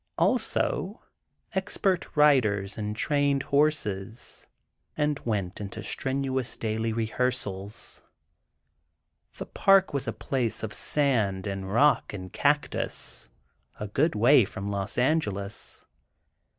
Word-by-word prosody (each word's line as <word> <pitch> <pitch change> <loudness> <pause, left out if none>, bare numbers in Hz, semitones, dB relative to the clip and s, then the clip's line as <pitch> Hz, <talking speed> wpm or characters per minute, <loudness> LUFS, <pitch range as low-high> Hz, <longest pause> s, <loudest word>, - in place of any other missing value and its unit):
Also, - - 0 0.5
expert 190 -3 -1
riders 110 -10 +3
and 105 -1 -3
trained 145 +2 +1
horses, 120 -8 -1 0.5
and 150 -1 +1
went 100 -4 -2
into 105 +2 -6
strenuous 130 +2 -2
daily 110 0 -1
rehearsal. 110 -3 -2 1.7
The - - -5
"Park" 195 -3 +4
was 140 - -1
a - - 0
place 125 -6 -2
of 110 - -4
sand 110 -10 +1
and 95 -1 -4
rock 140 +4 +3
and 95 -2 -7
cactus, 140 - 0 0.5
a 105 - -3
good 140 +9 +1
way 120 +4 +6
from 100 0 -5
Los 100 -1 -2
Angeles. 105 -8 -1
115 Hz, 105 wpm, -27 LUFS, 100-145 Hz, 1.7 s, way